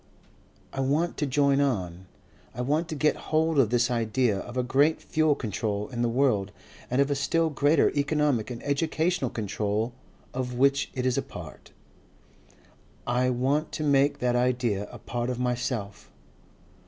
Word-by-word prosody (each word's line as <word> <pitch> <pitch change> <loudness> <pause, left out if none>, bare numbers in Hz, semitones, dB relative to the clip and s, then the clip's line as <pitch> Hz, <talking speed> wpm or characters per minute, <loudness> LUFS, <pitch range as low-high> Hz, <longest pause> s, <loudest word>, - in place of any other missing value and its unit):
I - - -5
want 145 +6 +1
to 150 - 0
join 140 +1 +3
on. 95 -9 -2 0.5
I 125 - -3
want 150 +6 0
to 160 - -4
got 150 +1 +2
hold 160 -1 +2
of 120 -6 +4
this 120 +1 +2
idea 115 -2 +1
of 120 +4 -7
a 125 - +1
great 140 +6 +2
fuel 155 -2 +1
control 105 -3 -3
in 120 -2 -4
the 120 - +2
world 115 -6 +1 0.4
and 125 - 0
of 140 +1 +3
a - - +2
still 160 +4 +1
greater 145 +2 +3
economic 145 -5 +1
and 120 -1 -7
educational 155 +1 0
control 105 +2 -2 0.4
of 125 -1 -3
which 140 +2 +2
it 125 -1 -2
is 130 -1 +2
a - - 0
part. - - -10 1.4
I 125 +1 +1
want 135 +5 0
to 155 - -3
make 140 -1 +3
that 125 0 0
idea 120 -5 0
a - - -9
part 120 0 -3
of 125 - -2
myself. 125 -4 -3
130 Hz, 165 wpm, -27 LUFS, 120-145 Hz, 1.4 s, of